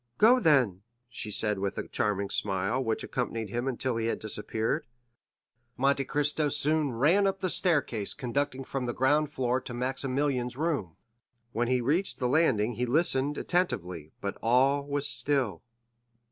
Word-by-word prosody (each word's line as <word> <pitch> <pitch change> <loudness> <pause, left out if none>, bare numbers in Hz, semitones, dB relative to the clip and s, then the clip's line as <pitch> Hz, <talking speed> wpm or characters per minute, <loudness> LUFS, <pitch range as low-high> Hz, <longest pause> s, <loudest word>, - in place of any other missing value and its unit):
"Go, 240 +4 +6
then," 125 - +3 0.3
she 115 -2 -6
said 105 -1 0
with 100 0 -3
a - - -4
charming 100 -1 -1
smile, 100 +6 0
which 110 -2 -1
accompanied 115 -4 -3
him 120 +3 -2
until 130 -2 -1
he 115 0 -1
had - - -1
disappeared. 110 +7 -3 0.9
Monte 135 +1 +2
Cristo 150 +2 0
soon 150 0 +4
ran 165 - +3
up 195 0 -1
the 185 -2 -1
staircase 140 - 0
conducting 135 +1 -2
from 130 -1 -4
the 120 - -3
ground 145 +3 +2
floor 130 -3 0
to 120 -1 -8
Maximilian's 130 0 -1
room; 145 - -2 0.6
when 120 0 -1
he 125 0 +1
reached 160 +11 +1
the 125 - -1
landing 125 -6 +2
he 125 +1 -1
listened 145 0 +1
attentively, 90 - -2
but 100 - -4
all 135 +4 +3
was 145 0 -1
still. 135 - -1
130 Hz, 155 wpm, -28 LUFS, 115-145 Hz, 0.9 s, Go